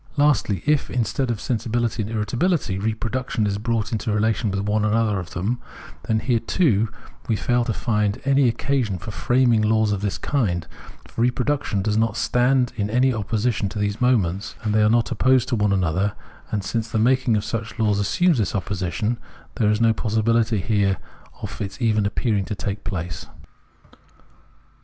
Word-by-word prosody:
Lastly, 125 - +2
if, 150 -1 +2
instead 120 +2 -1
of 115 -3 -1
sensibility 120 0 -1
and 105 - -4
irritabihty, 115 - 0
reproduction 110 +2 -1
is 100 0 -1
brought 115 -1 -1
into 110 0 -2
relation 110 +1 +1
with 100 0 -1
one 105 +1 0
or 110 0 +2
other 110 -4 +1
of 85 -2 -7
them, 105 +8 -1 0.5
then 110 -1 +1
here, 120 -3 +1
too, 115 - +1 0.4
we 115 - +1
fail 120 +2 +1
to - - -1
find 105 -3 0
any 140 -1 +4
occasion 120 -4 -1
for 110 +6 -7
framing 120 0 +2
laws 110 0 +2
of 100 -2 -1
this 100 -2 -1
kind; 100 - -1 0.4
for - - -5
reproduction 125 -3 0
does 105 0 0
not 110 0 +1
stand 125 0 +2
in 105 -1 -1
any 125 +3 +3
opposition 110 0 -1
to 105 - -7
those 105 +1 -2
moments, 100 -6 +1
as 105 - +1
they 110 0 +3
are 105 0 +4
opposed 120 +2 +2
to 125 - +1
one 105 -2 +1
another; 95 +2 +1 0.4
and 105 -2 -2
since 115 +2 -2
the 110 - -1
making 125 0 +3
of 105 - -3
such 115 0 -4
laws 105 -3 +2
assumes 160 - +2
this 95 -6 -1
opposition, 100 +4 -2 0.4
there 110 -4 +2
is 105 0 +2
no 115 -1 +4
possibility 110 0 +1
here 100 -1 +1 0.5
of - - -6
its 100 +5 -5
even 110 -4 +2
appearing 105 -1 0
to 105 +2 -4
take 100 +1 -4
place. 90 -2 -5
110 Hz, 175 wpm, -23 LUFS, 105-120 Hz, 0.5 s, any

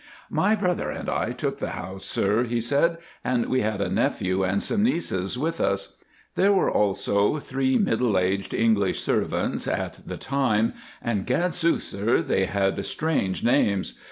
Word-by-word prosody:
"My 215 - +3
brother 180 -4 -1
and - - -5
I - - -1
took - - -3
the - - -2
house, 95 +1 -7
sir," 105 +5 +1
he 120 0 -1
said, 145 +8 +2 0.3
"and 125 -2 +1
we 130 - +1
had 105 -1 -1
a - - +1
nephew 95 +1 0
and 95 +2 +1
some 215 - 0
nieces 125 - 0
with 165 +5 -2
us. 100 0 -1 0.4
There 195 +2 +3
were 195 - +3
also 100 +4 +1
three 130 -2 0
middle 115 -3 +2
aged 95 +2 0
English 110 -4 +2
servants - - -1
at - - -2
the - - -6
time; 120 -5 +1 0.3
and, 105 -5 -1
gadsooth, 170 +5 +1
sir, 105 +4 0
they 95 - +1
had 95 0 0
strange 150 -12 -1
names. 110 -6 +2
115 Hz, 160 wpm, -25 LUFS, 100-145 Hz, 0.4 s, My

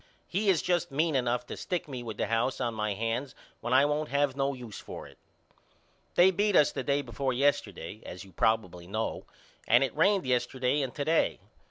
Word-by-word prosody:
He 200 +3 0
is 180 -5 +3
just 175 -1 +1
mean 155 +2 +1
enough 125 -2 0
to - - -6
stick 180 -3 -3
me 130 -4 -5
with 110 -3 -6
the - - 0
house 115 +3 0
on 115 - -1
my 105 -2 -2
hands 115 +5 -2 0.2
when 120 - -4
I 130 +2 +6
won't 150 +1 -1
have 140 -1 +1
no 140 0 0
use 120 -5 -8
for - - -8
it. - - -16 1.0
They 180 +2 +7
beat 205 +2 +1
us 150 - +6
the 135 - -3
day 140 +2 0
before 130 +1 -2
yesterday 110 - 0
as 90 0 -8
you 95 - -15
probibly 90 -3 0
know 110 +4 -3 0.4
and 120 +4 +6
it 135 - -2
rained 195 +4 +3
yesterday 130 +2 +1
and 135 -2 -2
to 145 - -2
day. 160 +1 +2
130 Hz, 205 wpm, -29 LUFS, 115-150 Hz, 1.0 s, They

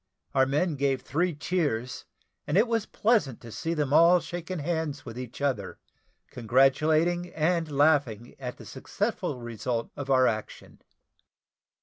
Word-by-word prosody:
Our 130 -1 +3
men 150 +3 0
gave 135 -2 0
three 165 +4 -1
cheers; 145 -7 -2 0.4
and - - +1
it 220 +4 +4
was 230 -2 -1
pleasant 210 - +1
to 115 - -10
see 165 +8 -3
them 145 -3 -1
all 170 +3 +6
shaking 175 +2 -6
hands 160 -2 -3
with 115 -2 -8
each 125 +1 -8
other, 105 -10 -1 0.5
congratulating 155 +8 +2
and 165 +1 +1
laughing 140 -6 +2
at 125 -2 -6
the - - -12
successful 125 - -3
result 120 0 -4
of 140 -1 -6
our 130 -1 +5
action. 110 -3 -4
145 Hz, 140 wpm, -27 LUFS, 125-170 Hz, 0.5 s, all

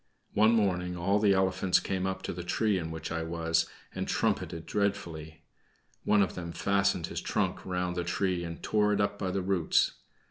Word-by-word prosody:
One 110 +2 +5
morning 90 -5 +1
all 100 +4 +2
the 100 -2 +4
elephants 95 -1 +2
came 95 -1 -2
up 95 - -3
to - - -3
the 90 0 -6
tree 105 +2 +1
in 80 -2 -4
which 80 0 -6
I 80 0 -1
was 85 0 0 0.3
and - - -3
trumpeted 80 -1 -1
dreadfully. 85 -7 -2 0.6
One 105 -1 +5
of 95 - -2
them 85 -2 -6
fastened 100 -3 +1
his - - -5
trunk - - -1
round 90 -1 -1
the 90 - -1
tree 90 0 0
and 85 -1 -7
tore 105 -1 +2
it 105 - 0
up 100 0 0
by 95 - -1
the 95 0 -1
roots. 90 -4 +2
90 Hz, 190 wpm, -30 LUFS, 85-100 Hz, 0.6 s, One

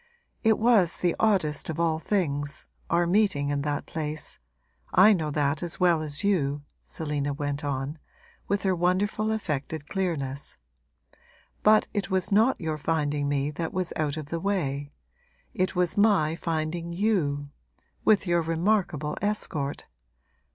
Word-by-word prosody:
It 220 -2 +4
was 220 -7 +3
the 175 -2 +1
oddest 180 -11 +1
of 160 0 -3
all 165 -2 +1
things, 145 -7 -1 0.2
our 170 +1 +3
meeting 175 -6 +2
in 145 -1 0
that 145 0 -2
place 155 -1 -5 0.5
I 210 +4 +7
know 160 -5 -1
that 145 +1 0
as 175 -2 -2
well 175 -3 +4
as 150 +2 -2
you,' 145 -8 +1 0.2
Selina 145 -2 -3
went 145 0 -3
on, 140 +2 -3 0.5
with 200 0 0
her 190 -1 +2
wonderful 195 +5 +1
affected 155 -7 -3
clearness; 150 -8 -3 1.0
'but 215 0 +5
it 200 -3 -2
was 190 -1 0
not 220 +6 +4
your 155 -3 -3
finding 150 -2 0
me 145 0 0
that 165 +2 -4
was 185 -2 -2
out 155 -1 -1
of 150 -2 -6
the 170 - -2
way; 145 -7 -1 0.6
it 185 -2 -1
was 180 -1 +1
my 200 -7 +3
finding 165 0 -2
you 165 -8 0 0.5
with 210 -2 +4
your 175 -1 +2
remarkable 165 -2 0
escort! 155 -9 -2
165 Hz, 145 wpm, -27 LUFS, 145-190 Hz, 1.0 s, I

